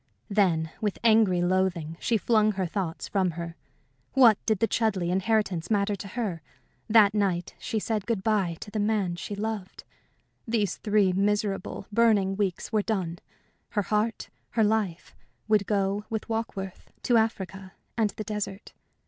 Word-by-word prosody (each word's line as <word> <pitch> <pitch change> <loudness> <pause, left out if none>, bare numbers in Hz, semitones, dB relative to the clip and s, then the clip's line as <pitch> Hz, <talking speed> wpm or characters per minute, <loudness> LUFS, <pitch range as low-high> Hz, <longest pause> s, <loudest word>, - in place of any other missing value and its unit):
Then, 170 -6 +2
with 210 -3 -1
angry 215 -6 +4
loathing, 175 -3 0
she 230 - +1
flung 215 +1 +3
her 190 -1 -1
thoughts 175 -2 -3
from 190 -3 +1
her. 170 -1 -5 0.6
What 240 -6 +6
did 220 -2 +3
the 225 - +2
Chudleigh 195 -7 0
inheritance 190 -3 0
matter 205 -1 +1
to 200 - -8
her? 200 -6 -3 0.5
That 210 -2 +6
night 190 -5 0
she 225 - -3
said 215 -1 -2
good 225 -5 -1
bye 195 -6 +1
to 205 - -8
the 215 - -2
man 205 -4 +1
she 205 +4 -5
loved. 210 -2 -4 0.6
These 220 -4 0
three 205 -3 +2
miserable, 200 0 -1
burning 205 -4 +3
weeks 195 -3 -2
were 215 - +2
done. 185 -6 -2 0.5
Her 205 - 0
heart, 215 +2 -1 0.2
her 225 - +2
life, 210 -5 -1 0.3
would 215 -2 +3
go 200 0 0
with 220 -1 -3
Warkworth 210 -4 -4 0.2
to 240 - +4
Africa 195 -4 -2 0.2
and 220 -3 +2
the 215 - -3
desert. 210 -1 -5
205 Hz, 155 wpm, -27 LUFS, 185-220 Hz, 0.6 s, What